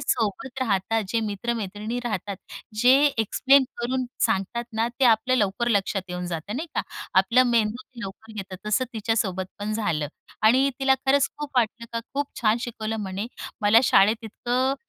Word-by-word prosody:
सोबत 245 +4 -1
राहतात 220 0 +1
जे 230 +3 +1
मी 220 - -2
मित्र-मैत्रिणी 215 +1 -3
राहतात. 205 -3 -3 0.4
जे 250 +3 +6 0.2
एक्सप्लेन 265 +5 +4
करून 255 +1 -1 0.2
सांगतात 195 +5 -1
ना 225 +1 0
ते - - +5
आपलं 240 +2 +4
लवकर 210 +2 +1
लक्षात 200 -3 +1
येऊन 180 0 -4
जातं 175 +6 -4
नाही 320 - -3
का. - - +1 0.4
आपला 230 +7 +5
मेंदू 235 0 +1
ते 250 -3 -13
लवकर 220 +3 -10
घेतं 195 -3 -7
तसं 215 +5 +2
तिच्यासोबत 210 -4 -1
पण 205 +1 -3
झालं. 170 -9 -1 0.3
आणि 255 +5 +5
तिला 270 0 +4
खरंच 275 +1 +4
खूप 295 -1 -5
वाटलं 230 0 +1
का 230 - -1
खूप 285 +1 0
छान 220 -1 +3
शिकवलं 225 -2 -4
म्हणे. 195 +2 -4 0.4
मला 210 +2 +6
शाळेत 215 +2 +5
इतकं 245 +4 0
225 Hz, 165 wpm, -25 LUFS, 205-245 Hz, 0.4 s, जे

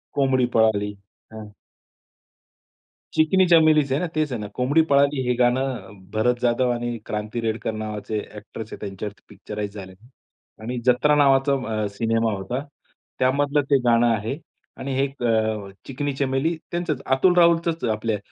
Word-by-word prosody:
कोंबडी 135 -3 +2
पळाली. 105 -2 +2 0.4
हं. 110 -1 -9 1.6
चिकनी 185 +4 +4
चमेलीच 155 -4 +5
आहे 135 - +2
ना, 180 - -1
तेच 155 -2 0
आहे 120 - -3
ना. 105 - -5
कोंबडी 135 +6 +3
पळाली 140 0 +3
हे 125 - +3
गाणं 125 -3 0
भरत 110 +3 +2
जाधव 125 +1 +2
आणि 120 0 -3
क्रांती 105 +2 -4
रेडकर 115 0 -2
नावाचे 110 0 -4
अ‍ॅक्ट्रेस 105 +1 -9
आहेत - - -8
त्यांच्यावरती 100 0 -7
पिक्चराईज 105 0 -6
झालंय. 95 -3 -9 0.7
आणि 120 +3 -4
जत्रा 130 +4 +4
नावाचा 140 -1 +4 0.3
अ, - - 0
सिनेमा 115 0 +1
होता. 100 +7 -4 0.6
त्यामधलं 140 +3 +2
ते 140 - +6
गाणं 120 0 +4
आहे 110 +6 -4 0.4
आणि 135 0 -4
हे 135 - +2
एक 140 -2 -5
अ, 110 -3 0 0.2
चिकनी 140 +1 -3
चमेली, 135 +4 0 0.2
त्यांचंच 170 -6 -2
अतुल 135 +8 +3
राहुलचंच, 170 -1 +3
आपल्या 110 0 -2
125 Hz, 145 wpm, -23 LUFS, 110-140 Hz, 1.6 s, ते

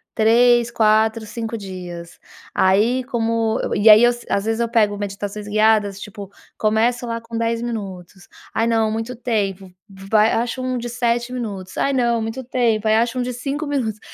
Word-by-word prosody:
3, 240 +1 +4
4, 220 -1 +2
5 225 +2 -5
dias. 180 -4 -8 0.3
Aí, 215 +7 +2
como 230 -2 0
eu - - -2
eu - - 0
e 210 +2 +5
aí 215 +2 +9
eu 240 0 +5
se 240 - -12
às 200 - 0
vezes 225 +1 -1
eu 235 - 0
pego 215 -3 +2
meditações 205 +1 -5
guiadas, 210 -2 +2
tipo, 205 -2 -9 0.3
começo 225 +3 +1
lá 230 0 -3
com 230 0 -10
10 230 0 -1
minutos. 195 -5 -7 0.3
"Ai 225 - +1
não, 225 -2 +1
muito 225 +3 -4
tempo", 200 -6 -2 0.2
v 195 0 -13
vai 215 +1 +4
acho 240 +2 -1
um 255 0 -2
de 240 0 -4
7 240 0 -1
minutos, 200 -7 -6
"Ai 275 - +1
não, 235 -3 +1
muito 225 +4 -4
tempo", 230 -3 0
aí 215 - +4
acho 230 +2 +1
um 250 - 0
de 250 0 -4
5 275 +5 -4
minutos. 245 -7 -2
225 Hz, 190 wpm, -20 LUFS, 210-240 Hz, 0.3 s, aí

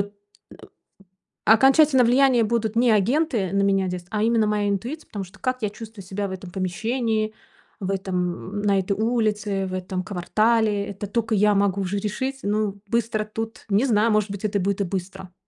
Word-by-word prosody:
э, 200 +1 -3 1.3
окончательно 265 +3 +5
влияния 250 -1 +4
будут 225 0 -1
не 240 0 +4
агенты 225 - +2
на 200 0 +1
меня 195 -2 +2
здесь, 180 -1 -5
а 210 +1 -1
именно 225 -1 +3
моя 210 -1 0
интуиция, 240 +11 -3
потому 200 -2 -5
что 185 +3 -18
как 255 -1 -2
я 210 - 0
чувствую 215 -2 -10
себя 195 +2 -3
в - - -7
этом 185 -1 -8
помещении, 220 +4 -1 0.5
в 190 0 -2
этом, 185 0 -3
м, - - -2
на 200 -1 +2
этой 190 +1 -1
улице, 210 -3 0
в 185 - -6
этом 185 0 -3
квартале, 210 +2 +1
это 200 +1 -6
тока 225 +1 -1
я 210 +1 +4
могу 200 -1 +1
уже 195 +1 -2
решить. 260 +6 -3
Ну, 205 -1 -1
быстро 220 -1 0
тут 225 +1 -6
не 205 +4 +3
знаю, 225 -3 +3
может 210 -1 +1
быть, 200 +1 -5
это 205 -1 0
будет 200 +2 -1
и - - +1
быстро. 185 0 -6
210 Hz, 185 wpm, -23 LUFS, 195-225 Hz, 1.3 s, окончательно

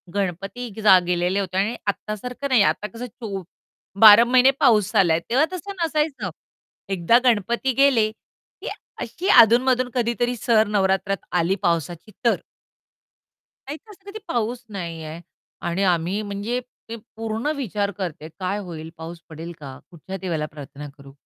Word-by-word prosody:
गणपती 200 +5 -3
जा 195 -3 +8
गेलेले 180 +2 +1
होते 185 -2 -3
आणि 205 +5 +1
आता 210 +1 -2
सारखं 250 +6 -5
नाही. 255 -5 +5
आता 210 - 0
कसं 230 +5 -8
चो 205 -5 -7 0.6
12 220 +1 +10
महिने 255 +2 +5
पाऊस 220 -7 +3
आला 185 -5 +5
आहे. 160 - +1
तेव्हा 265 +6 +3
तसं 370 +3 -6
नसायचं 300 - -1 0.6
एकदा 185 +5 +4
गणपती 235 +2 +1
गेले, 260 -5 +4
की 220 - -13 0.3
अशी 365 - -5
अधून-मधून 250 +2 +3
कधीतरी 240 0 0
सर 220 -1 +3
नवरात्रात 195 -1 +1 0.2
आली 175 +3 +1
पावसाची 170 +3 -1
तर. 235 - +3 1.3
नाहीतर 315 +9 -8
असं 390 -1 -18
कधी 430 +2 -7
पाऊस 240 +1 -2
नाही 170 -5 -6
आहे 155 +2 -8 0.5
आणि 175 +3 -1
आम्ही 180 +2 +1
म्हणजे 205 +4 -3 0.3
ते 230 - -4 0.2
पूर्ण 225 +3 -3
विचार 210 -7 -2
करते, 170 -5 -5
काय 190 +2 -2
होईल 165 -5 -8
पाऊस 165 +1 -8
पडेल 165 +2 -8
का? 135 -3 -9
कुठच्या 180 +3 -8
देवाला 165 -5 -2
प्रार्थना 145 0 -9
करू? 140 -1 -14
205 Hz, 150 wpm, -23 LUFS, 175-240 Hz, 1.3 s, 12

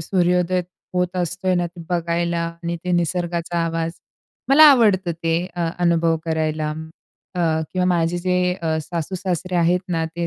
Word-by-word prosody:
सूर्योदय 180 +1 +1 0.3
होत 180 0 0
असतोय 180 +1 0
ना, 175 -1 +1
ते 170 0 -12
बघायला 170 0 0 0.2
आणि 170 0 -2
ते 180 - -1
निसर्गाचा 175 0 -1
आवाज 165 0 -2 0.6
मला 300 +3 +8
आवडतं 200 -9 +3
ते 165 -1 +1 0.2
अ, 170 -2 -1
अनुभव 170 -1 +2
करायला. 155 -1 -1 0.6
अ, 180 - -2 0.3
किंवा 185 -1 0
माझे 170 +1 0
जे 180 0 +1
अ, 160 -1 0
सासू-सासरे 180 +2 -3
आहेत 175 +1 +3
ना, 165 -2 0
ते 170 +1 -4
175 Hz, 145 wpm, -21 LUFS, 165-180 Hz, 0.6 s, मला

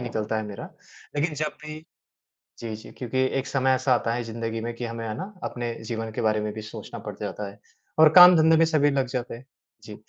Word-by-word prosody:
निकलता 110 -3 -3
है 110 - -1
मेरा 100 -1 -7 0.5
लेक़िन 150 +1 0
जब 150 0 -2
भी 155 0 -7 0.8
जी, 115 -2 -5
जी 110 - -12
क्योंकि 125 0 -4 0.2
एक 130 - -3
समय 130 -1 +1
ऐसा 130 0 +2
आता 115 -1 0
है 120 - -2
ज़िंदगी 115 0 -4
में 120 +1 -4
कि 120 - -6
हमें 115 0 -5
है 110 - -3
ना 190 +4 -6
अपने 120 -1 -3
जीवन 115 0 -4
के - - -4
बारे 110 -1 +2
में 105 0 -3
भी 110 - -7
सोचना 105 - -8
पड़ - - -7
जाता 105 -1 -4
है। 100 - -17 0.4
और 155 -1 +9
काम 180 0 +11
धंधे 160 0 +5
में 165 - +5
सभी 150 -2 +3
लग 135 -2 0
जाते 125 -2 -4
हैं। 125 +3 -11 0.4
जी, - - -9
120 Hz, 230 wpm, -25 LUFS, 110-145 Hz, 0.8 s, काम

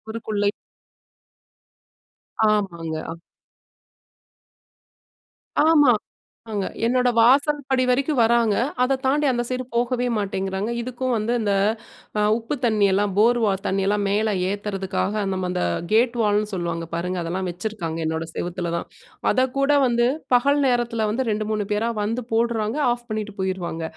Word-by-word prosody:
சுவருகுள்ளயே. 215 -2 -1 2.0
ஆமாங்க. 170 -6 -1
அ. 165 - -6 2.5
ஆமா. 290 -6 +6 0.6
அங்க. 200 -2 -1 0.2
என்னோடய 250 0 +2
வாசல் 280 +6 +5
படி 260 -1 +2
வரைக்கும் 270 +2 +1
வராங்க, 230 -2 +3 0.3
அதை 270 +1 +2
தாண்டி 295 +3 +2
அந்த 240 -1 -1
சைடு 255 0 -2
போகவே 245 +1 0
மாட்டேங்கிறாங்க. 195 0 -2
இதுக்கும் 255 +1 -2
வந்து 225 +2 0
இந்த 205 -2 0 0.7
அ - - +2 0.2
உப்பு 235 +5 -4
தண்ணியெல்லாம் 205 -2 +2
போர் 240 +3 +4
வா 200 - +2
தண்ணியெல்லாம் 195 +2 +1
மேலே 210 +1 +1 0.2
ஏத்துறதுக்காக 200 0 -2
நம்ம 185 -1 -2
அந்த 90 - -1 0.3
கேட் 235 +2 +3
வால்ன்னு 210 0 +1
சொல்லுவாங்க 170 -2 -3
பாருங்க, 180 +2 -2
அதெல்லாம் 180 +2 -3
வச்சுருக்காங்க 175 -3 -4
என்னோட 160 +1 -2
செவத்துல 175 -1 -3
தான். - - -5 0.4
அதைக்கூட 275 +2 +1 0.2
வந்து 240 0 +2 0.3
பகல் 280 +4 +3
நேரத்தில 235 -3 0
வந்து 260 +4 -1
2 215 0 -2
3 210 -1 -1
பேரா 225 +3 0
வந்து 230 +3 -2
போடுறாங்க, 230 +1 0
ஆஃப் 240 0 -4
பண்ணீட்டு 215 -1 -4
போயிருவாங்க. 180 -3 -3
215 Hz, 130 wpm, -23 LUFS, 195-245 Hz, 2.5 s, ஆமா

